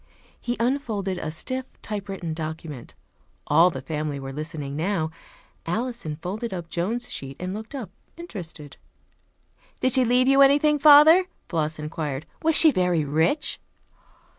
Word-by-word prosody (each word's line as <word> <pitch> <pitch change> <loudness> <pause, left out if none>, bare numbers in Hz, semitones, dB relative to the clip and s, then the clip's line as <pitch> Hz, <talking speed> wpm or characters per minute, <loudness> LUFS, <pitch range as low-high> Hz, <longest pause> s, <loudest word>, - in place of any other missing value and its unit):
He 240 0 -3
unfolded 225 -7 -1
a - - -4
stiff 255 +11 -4 0.2
typewritten 195 -5 -5
document. 155 -4 -7 0.5
All 170 +2 +5
the 135 -6 -7
family 150 0 -4
were 135 0 -7
listening 150 -2 -6
now. 160 0 -1 0.6
Alison 225 -4 -3
folded 200 +9 -5
up 170 -3 -6
Joan's 225 +9 -3
sheet 135 0 -7
and 185 +1 -4
looked 220 +6 -8
up, 225 -10 -6 0.3
interested. 170 - -8 1.0
"Did 255 - +1
she 255 +1 +4
leave 250 +2 +3
you 275 +1 +5
anything, 290 +2 +4
father?" 310 +5 +8 0.2
Floss 155 -2 -2
inquired. 150 -2 -5 0.2
"Was 320 -1 +3
she 315 - +9
very 180 - +1
rich?" 160 - 0
180 Hz, 140 wpm, -24 LUFS, 155-250 Hz, 1.0 s, she